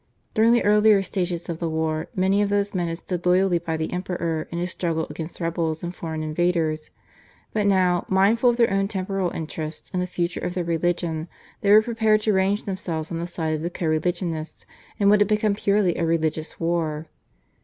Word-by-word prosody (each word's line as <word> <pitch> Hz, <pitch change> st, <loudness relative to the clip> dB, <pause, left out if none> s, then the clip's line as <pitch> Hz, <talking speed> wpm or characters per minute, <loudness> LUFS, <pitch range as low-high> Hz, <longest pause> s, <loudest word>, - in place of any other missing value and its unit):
During 225 Hz, +2 st, +4 dB
the 240 Hz, -, +4 dB
earlier 210 Hz, -1 st, +5 dB
stages 180 Hz, -3 st, -3 dB
of 165 Hz, -1 st, -4 dB
the 170 Hz, -, -1 dB
war 160 Hz, 0 st, -1 dB
many 190 Hz, +1 st, +2 dB
of 205 Hz, -, +1 dB
those 205 Hz, 0 st, 0 dB
men 175 Hz, -3 st, -1 dB
had 165 Hz, 0 st, -3 dB
stood 175 Hz, 0 st, -5 dB
loyally 180 Hz, 0 st, +3 dB
by 160 Hz, -1 st, -3 dB
the 160 Hz, 0 st, -3 dB
Emperor 170 Hz, -3 st, -2 dB
in 170 Hz, -, -5 dB
his 175 Hz, +1 st, -2 dB
struggle 165 Hz, -2 st, -1 dB
against 160 Hz, +1 st, -7 dB
rebels 165 Hz, -1 st, -2 dB
and 175 Hz, 0 st, -4 dB
foreign 160 Hz, -3 st, -5 dB
invaders, 155 Hz, -1 st, 0 dB, 0.6 s
but 210 Hz, -2 st, +1 dB
now, 185 Hz, -3 st, +2 dB
mindful 205 Hz, +6 st, +4 dB
of 240 Hz, -, +1 dB
their 235 Hz, -4 st, +3 dB
own 195 Hz, 0 st, +1 dB
temporal 190 Hz, -2 st, -2 dB
interests 160 Hz, -1 st, -6 dB
and 180 Hz, -, 0 dB
the 180 Hz, -, -2 dB
future 175 Hz, -1 st, -2 dB
of 180 Hz, +1 st, -4 dB
their 180 Hz, -, 0 dB
religion, 170 Hz, -1 st, -1 dB, 0.3 s
they 200 Hz, -, +1 dB
were 215 Hz, +1 st, +8 dB
prepared 220 Hz, -2 st, +2 dB
to 215 Hz, 0 st, +1 dB
range 195 Hz, +2 st, +1 dB
themselves 175 Hz, -5 st, -4 dB
on 165 Hz, -, -3 dB
the 170 Hz, -, -3 dB
side 160 Hz, -2 st, -2 dB
of 155 Hz, -, -2 dB
their 170 Hz, -, -2 dB
co 175 Hz, -, -5 dB
religionists 160 Hz, 0 st, -2 dB, 0.3 s
in 200 Hz, -, +2 dB
what 205 Hz, +1 st, +5 dB
had 205 Hz, -, +4 dB
become 215 Hz, 0 st, +2 dB
purely 200 Hz, -3 st, +2 dB
a -, -, -1 dB
religious 160 Hz, -1 st, -1 dB
war. 165 Hz, -2 st, -1 dB
175 Hz, 205 wpm, -24 LUFS, 165-195 Hz, 0.6 s, were